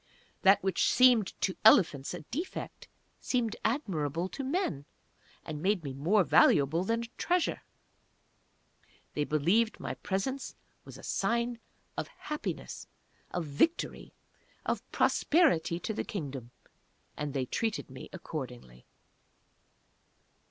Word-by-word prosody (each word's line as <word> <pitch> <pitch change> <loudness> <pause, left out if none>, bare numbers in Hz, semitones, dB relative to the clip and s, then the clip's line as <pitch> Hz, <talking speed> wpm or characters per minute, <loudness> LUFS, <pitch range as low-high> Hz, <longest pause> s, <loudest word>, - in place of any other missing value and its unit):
That 195 +1 +5
which 190 -3 +2
seemed 245 -5 +4
to 185 - +1
elephants 160 -10 +5
a - - -7
defect, 340 +7 -5 0.3
seemed 240 -4 0
admirable 180 - -1
to 275 - -5
men, 265 - -1 0.6
and 150 -2 -5
made 190 -1 +1
me 140 -2 -4
more 175 +10 +3
valuable 155 +1 +4
than 230 +4 0
a 235 - -10
treasure. 355 -1 +1 1.5
They 150 - 0
believed 175 +11 +2
my - - -4
presence 260 +8 -3 0.3
was - - -10
a - - -13
sign 235 0 0 0.4
of - - -2
Happiness 300 0 -6 0.4
of 175 -2 -3
Victory 150 - 0 0.5
of - - 0
Prosperity 270 - +3
to 220 - -2
the - - -2
Kingdom 140 - -5 0.7
and 150 -1 -4
they 130 -2 0
treated 220 - -2
me 130 - -9
accordingly. 125 - -7
190 Hz, 115 wpm, -31 LUFS, 150-235 Hz, 1.5 s, That